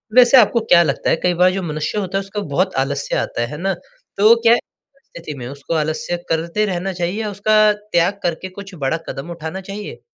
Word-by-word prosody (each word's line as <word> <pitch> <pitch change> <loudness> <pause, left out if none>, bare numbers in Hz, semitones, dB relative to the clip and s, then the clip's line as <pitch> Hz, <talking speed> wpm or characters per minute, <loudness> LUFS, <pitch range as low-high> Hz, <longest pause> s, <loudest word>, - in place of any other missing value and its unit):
वैसे 250 +1 +7
आपको 235 0 +5
क्या 170 - +7
लगता 140 -4 -1
है - - +4
कई 180 - +3
बार 185 0 +6
जो 195 - -3
मनुष्य 155 +4 -3
होता 195 -1 -2
है - - +1
उसको 195 +1 -5
बहुत 185 +5 +1
आलस्य 140 +1 -3
आता - - -2
है। 120 - 0
है 150 - -7
ना? 190 +4 -1 0.4
तो 215 +3 +7
क्या 230 0 +6
परिस्थिति 240 - -10
में 120 -2 -6
उसको 140 +4 -6
आलस्य 155 +3 -2
करते 170 +6 0
रहना 190 -1 -2
चाहिए 180 +4 -2
या 210 - -2
उसका 215 +1 +4
त्याग 200 -2 0
करके 175 +2 -2
कुछ 195 -1 -9
बड़ा 145 0 -1
कदम 140 +4 -6
उठाना 170 +2 -6
चाहिए? 200 +2 -8
185 Hz, 215 wpm, -19 LUFS, 160-210 Hz, 0.4 s, वैसे